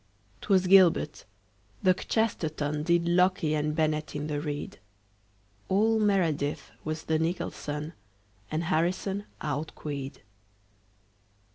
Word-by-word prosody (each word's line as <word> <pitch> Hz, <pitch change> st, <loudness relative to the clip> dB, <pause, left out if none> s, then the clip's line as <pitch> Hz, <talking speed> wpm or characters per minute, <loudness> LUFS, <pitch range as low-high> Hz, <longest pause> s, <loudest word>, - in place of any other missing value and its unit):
'Twas 190 Hz, -2 st, +3 dB
gilbert. 180 Hz, -5 st, +4 dB, 0.6 s
The 185 Hz, -, +6 dB
kchesterton 155 Hz, -8 st, -1 dB
Did 170 Hz, +1 st, +2 dB
locke 180 Hz, +2 st, +3 dB
and 150 Hz, -1 st, 0 dB
bennett 155 Hz, -1 st, 0 dB
in 145 Hz, 0 st, -3 dB
the 150 Hz, -1 st, -2 dB
reed. 145 Hz, -1 st, -5 dB, 0.9 s
All 220 Hz, +3 st, +3 dB
meredith 170 Hz, -9 st, +1 dB
was 155 Hz, 0 st, -4 dB
the 160 Hz, 0 st, +1 dB
nicholson, 160 Hz, -2 st, -3 dB, 0.6 s
And 155 Hz, +2 st, -1 dB
harrison 185 Hz, +4 st, 0 dB, 0.2 s
outqueed. 145 Hz, -2 st, -4 dB
160 Hz, 100 wpm, -28 LUFS, 150-185 Hz, 0.9 s, The